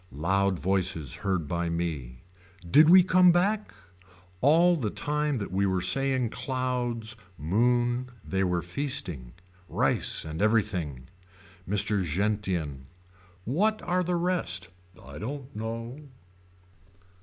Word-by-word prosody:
Loud 95 +6 0
voices 90 -6 0
heard 95 -6 -2
by 85 +2 -2
me. 75 -8 -4 0.4
Did 150 - +6
we 185 +1 +8
come 185 -1 +5
back. 205 +5 +1 0.7
All 170 +5 +5
the 125 -10 -2
time 150 +3 -1
that 100 - -5
we 100 +1 +1
were 95 -1 0
saying 130 +4 +2
clouds 125 -3 -3 0.2
moon 120 +9 +1 0.2
they 95 0 0
were 90 -2 0
feasting. 85 - -3 0.4
Rice - - +2
and 80 +2 -5
everything. 95 - 0 0.6
Mr. 105 0 +2
Gentian. 90 -6 -2 0.6
What 210 - +1
are 180 +1 0
the 180 0 -1
rest. 170 - -1 0.3
I - - -11
don't 135 +3 -7
know. 115 +4 -5
105 Hz, 115 wpm, -27 LUFS, 90-140 Hz, 0.7 s, we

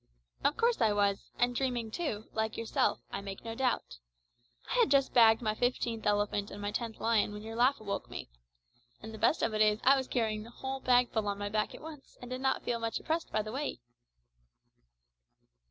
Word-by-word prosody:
"Of 295 - +2
course 470 0 +2
I 215 -2 +4
was, 200 -1 +1
and 245 0 +2
dreaming 240 -4 -1
too, 225 -9 -3
like 220 0 -1
yourself, 230 -1 0
I - - -3
make 195 +1 -8
no 225 - -4
doubt. 145 - -1 0.7
I - - -3
had 470 - +5
just 275 -1 +3
bagged 225 -1 +6
my 215 -1 +1
fifteenth 235 -1 -1
elephant 205 0 +1
and 205 - -8
my 205 0 -3
tenth 230 0 -4
lion 225 -2 +2
when 210 0 -7
your 225 +1 -7
laugh 255 +4 +3
awoke 200 -2 -4
me. - - -6 0.8
And 220 0 -7
the 220 - -8
best 315 - +3
of 225 - +1
it 215 - +1
is 210 -1 +5
that - - +4
I 275 - +8
was 260 -1 -2
carrying 220 -3 0
the 225 - -10
whole 265 +2 -5
bagful 245 -4 +2
on 200 0 -1
my 205 0 -3
back 215 0 -1
at - - -11
once, 305 -3 -11
and 245 0 -10
did 255 0 -4
not 265 0 +1
feel 235 -1 -1
much 230 0 -2
oppressed 325 +1 -2
by 215 - 0
the 215 - -6
weight." 275 - -3
225 Hz, 215 wpm, -31 LUFS, 210-255 Hz, 0.8 s, I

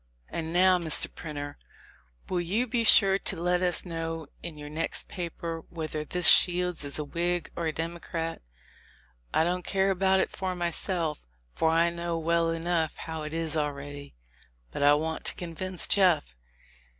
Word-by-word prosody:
And 160 -1 -4
now, 180 +1 +4
Mr. 160 -3 -1
Printer, 145 -2 -7 0.7
will 180 -1 -1
you 200 +8 0
be 240 -1 0
sure 195 -3 +7
to 190 - -3
let 180 +1 +1
us 180 0 +1
know 165 -2 -4 0.2
in 170 -3 -8
your 150 0 -8
next 155 +2 -2
paper 170 -2 -5
whether 155 -2 -4
this 180 +3 +1
Shields 180 -2 +6
is 140 -1 -1
a 150 - -2
Whig 170 +3 -2
or 170 -1 -2
a - - 0
Democrat? 165 0 -4 0.9
I - - +3
don't 180 +2 0
care 195 +1 +1
about 190 0 +2
it - - 0
for 185 -1 -3
my 175 -1 -1
self, 165 -4 0 0.3
for 160 - +1
I 165 +1 +3
know 170 0 -3
well 165 +1 +1
enough 165 -1 -1
how 160 -1 -6
it 150 0 -6
is 165 -1 -2
already; 145 - -4 0.6
but - - -5
I 145 +1 +6
want 160 +2 -3
to - - -3
convince 180 +1 -1
Jeff. 185 -6 +3
170 Hz, 170 wpm, -28 LUFS, 160-180 Hz, 0.9 s, sure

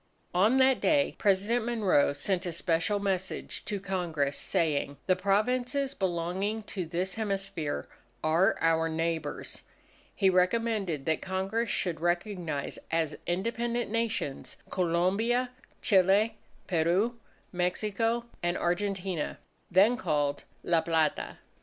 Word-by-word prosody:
On 210 +8 +4
that 265 -1 +4
day 290 -2 +3
President 205 +4 +2
Monroe 215 -12 +2
sent 180 +6 -1
a 175 - -3
special 170 +4 +1
message 190 -1 -2
to 205 - -2
Congress 170 -7 -1
saying, 145 -3 0
"the 185 - +3
Provinces 250 +8 +1
belonging 190 +3 -1
to 185 -4 -5
this 180 +3 -2
hemisphere 195 -7 -3 0.4
are 165 +6 +3
our 165 0 +3
neighbours." 160 -2 -3 0.5
He 195 - +3
recommended 185 -4 +1
that 160 -1 +1
Congress 195 +5 -1
should 170 -4 -1
recognize 175 -4 -2
as 160 -2 0
independent 230 +5 -1
Nations, 230 -11 -2
Colombia, 195 +8 +1 0.3
Chile, 200 +3 +4 0.3
Peru, 185 +8 +1 0.3
Mexico, 215 +6 0 0.2
and 175 0 0
Argentina, 185 -2 -1 0.3
then 200 +7 +5
called 145 - -1 0.2
La 170 -2 +3
Plata. 160 -2 0
190 Hz, 110 wpm, -29 LUFS, 170-215 Hz, 0.5 s, then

